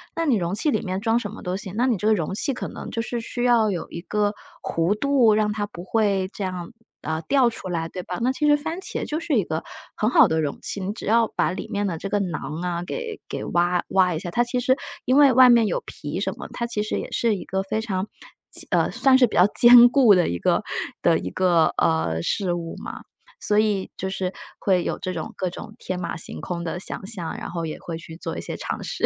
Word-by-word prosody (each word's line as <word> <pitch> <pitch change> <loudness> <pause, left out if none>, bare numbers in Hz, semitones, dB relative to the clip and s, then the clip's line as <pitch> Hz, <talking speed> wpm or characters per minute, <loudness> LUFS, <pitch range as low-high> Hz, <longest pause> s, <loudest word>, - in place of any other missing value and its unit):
那 330 - -1
你 260 -8 +3
容 175 +1 -2
器 290 +8 +2
里 - - 0
面 185 -1 -3
装 225 +2 +2
什 210 - -5
么 220 - -10
都 180 +1 -2
行， 195 -3 -6
那 245 +3 +2
你 240 -6 +2
这 210 - -1
个 220 - +5
容 170 0 -2
器 275 +7 +1
可 245 - -5
能 - - -8
就 230 - -2
是 240 +1 -3
需 240 +1 -3
要 235 -3 +4
有 175 -3 -4
一 170 - -6
个 205 +3 0 0.3
弧 170 +6 0
度， 255 -5 +4
让 215 -1 +1
它 210 -1 -2
不 175 -3 -10
会 200 -3 +1
这 200 - -4
样， 180 0 -5 0.3
呃， 160 +1 -3
掉 260 - +3
出 225 - -8
来， 165 -2 -2
对 185 - -6
吧？ 180 - -5
那 250 - +2
其 300 +3 0
实 295 - +6
番 320 +4 -4
茄 - - -2
就 305 - -2
是 325 -3 -3
一 210 - +3
个 160 -1 -4 0.3
很 215 - +1
好 - - +6
的 160 - +1
容 150 -3 -2
器， - - -1
你 190 +2 -3
只 - - -8
要 230 +1 +3
把 - - +1
里 185 - -5
面 205 0 -2
的 170 -4 -2
这 195 - -5
个 205 0 0
瓤 180 -3 -3 0.3
啊， 175 -1 -2
给 460 - -5
给 - - -5
挖 175 +1 +1
挖 185 -2 +3
一 - - -2
下， 175 - -6
它 240 +6 +2
其 245 +1 -1
实 260 +2 +2 0.3
因 255 +2 +2
为 280 -3 +7
外 255 0 +8
面 235 -2 +5
有 - - -1
皮 - - -5
什 - - -1
么， - - -7
它 235 - -2
其 235 -3 -2
实 215 - -2
也 - - -8
是 230 -3 +1
一 - - -6
个 190 +1 -2
非 215 +3 -2
常 195 -3 -2 0.4
坚 - - +1
呃， - - +2
算 265 -1 +4
是 255 -2 +5
比 - - -7
较 180 - +6
坚 240 +2 +8
固 240 -5 +6
的 180 - +3
一 85 - -3
个 - - +1 0.4
的 - - +4
一 90 - -5
个， 175 - +3
呃， 80 0 +1
事 185 -4 0
物 170 -1 -4
嘛， - - -8 0.4
所 210 0 +2
以 205 -3 0
就 190 - -3
是 190 -1 -3 0.3
会 185 -3 +2
有 - - -2
这 185 - -4
种 160 -3 -5
各 185 - -2
种 210 +4 -10
天 185 -5 -4
马 170 -1 -4
行 165 - -4
空 170 -1 -4
的 170 +1 -4
想 190 - -6
像， 190 -6 -2
然 - - -6
后 170 -1 -3
也 155 - -5
会 165 -2 -6
去 165 -1 -10
做 165 - -6
一 - - -4
些 - - -5
尝 - - -5
试。 - - -2
200 Hz, 280 characters per minute, -23 LUFS, 175-235 Hz, 0.4 s, 外